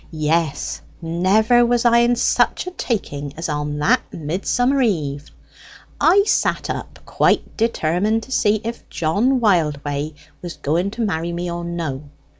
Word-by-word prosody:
"Yes; 155 Hz, -1 st, -1 dB, 0.2 s
never 195 Hz, +8 st, +3 dB
was 240 Hz, 0 st, +1 dB
I 235 Hz, 0 st, +5 dB
in 240 Hz, +1 st, +3 dB
such 240 Hz, -, +1 dB
a 365 Hz, -, -5 dB
taking 145 Hz, -, -4 dB
as 165 Hz, -, -3 dB
on 150 Hz, -1 st, -3 dB
that 150 Hz, -, +3 dB
Midsummer 225 Hz, -, 0 dB
eve! 150 Hz, -, -1 dB, 0.7 s
I 390 Hz, +4 st, +5 dB
sat 425 Hz, -, 0 dB
up, -, -, -7 dB
quite -, -, +1 dB
determined 215 Hz, 0 st, 0 dB
to 265 Hz, -, -13 dB
see 210 Hz, -4 st, +2 dB
if 230 Hz, +1 st, -6 dB
John 210 Hz, +12 st, +1 dB
Wildway 150 Hz, -7 st, 0 dB, 0.3 s
was 175 Hz, -1 st, -7 dB
going 170 Hz, +7 st, 0 dB
to -, -, -2 dB
marry 170 Hz, -3 st, -2 dB
me 175 Hz, +1 st, -3 dB
or 170 Hz, 0 st, -4 dB
no. 155 Hz, -5 st, -4 dB
175 Hz, 145 wpm, -20 LUFS, 155-230 Hz, 0.7 s, I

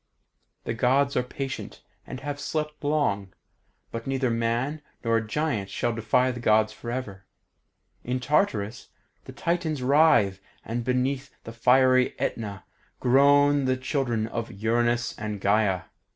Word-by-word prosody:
The -, -, -3 dB
Gods 135 Hz, +4 st, +2 dB
are -, -, +3 dB
patient, 130 Hz, +2 st, -6 dB, 0.2 s
and 130 Hz, -, -7 dB
have 145 Hz, +1 st, -4 dB
slept 150 Hz, 0 st, -4 dB
long, 120 Hz, -11 st, 0 dB, 0.6 s
but 115 Hz, +1 st, -6 dB
neither 135 Hz, -2 st, 0 dB
man 115 Hz, +6 st, -1 dB, 0.2 s
nor 115 Hz, -1 st, +2 dB
giant 110 Hz, -3 st, -2 dB
shall 120 Hz, -, -1 dB
defy 125 Hz, +3 st, +2 dB
the 120 Hz, -, -6 dB
Gods 110 Hz, -2 st, +3 dB
forever. 120 Hz, -6 st, -6 dB, 0.8 s
In 125 Hz, +1 st, -2 dB
Tartarus 125 Hz, -, 0 dB, 0.4 s
the -, -, -9 dB
Titans 165 Hz, -5 st, -2 dB
writhe, 130 Hz, -9 st, +4 dB, 0.3 s
and 115 Hz, +1 st, -3 dB
beneath 130 Hz, +3 st, -1 dB
the 115 Hz, -, -8 dB
fiery 130 Hz, +2 st, +4 dB
Aetna 100 Hz, -4 st, -3 dB, 0.4 s
groan 140 Hz, +2 st, +4 dB
the 130 Hz, 0 st, +1 dB
children 130 Hz, -4 st, -1 dB
of 115 Hz, +1 st, -4 dB
Uranus 120 Hz, +3 st, 0 dB
and 105 Hz, -1 st, -4 dB
Gaea. 100 Hz, -2 st, +2 dB
125 Hz, 130 wpm, -26 LUFS, 115-140 Hz, 0.8 s, writhe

